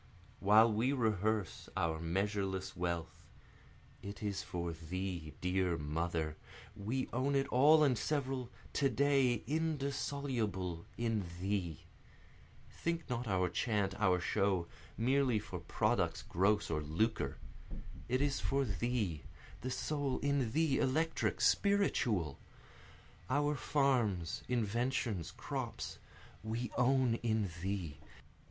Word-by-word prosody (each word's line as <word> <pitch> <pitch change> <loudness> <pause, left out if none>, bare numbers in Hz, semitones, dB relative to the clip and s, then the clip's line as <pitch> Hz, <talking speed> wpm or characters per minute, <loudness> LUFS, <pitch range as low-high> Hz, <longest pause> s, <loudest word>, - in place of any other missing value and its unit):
While 110 +3 +6
we 120 +6 +2
rehearse 110 - 0
our 80 -1 0
measureless 95 +2 -1
wealth, 85 -2 -3 0.8
it 100 +1 -7
is 100 -2 -1
for 85 -1 -3
thee, 85 0 -5
dear 90 -1 +1
Mother, 80 +1 -2 0.4
We 120 +6 -2
own 135 +3 +1
it 135 0 +2
all 150 +5 +6
and 135 -4 +4
several 130 0 -1 0.2
to 140 -2 +3
day 135 -4 +3
indissoluble 140 - -2
in 115 -4 0
thee; 95 -5 -2 0.9
Think 170 -4 -3
not 120 0 -2
our 95 -3 +2
chant, 100 +2 0
our 95 -4 +4
show, 95 0 +1 0.3
merely 130 0 +3
for 100 -4 -5
products 85 - 0
gross 100 +2 +1
or 75 -1 0
lucre 95 +9 0 0.7
it 130 +3 +2
is 145 -2 +1
for 135 0 +1
thee, 105 - -1 0.4
the 130 - -3
soul 140 +1 -1
in 140 -5 +1
thee, 155 -1 +2
electric, 160 +5 +1
spiritual! 120 - +2 0.9
Our 145 +2 +2
farms, 125 - +1
inventions, 115 - 0
crops, - - -5 0.4
we 115 +1 -3
own 125 -1 +3
in 110 -5 0
thee! 90 -6 -3
110 Hz, 110 wpm, -35 LUFS, 90-135 Hz, 0.9 s, While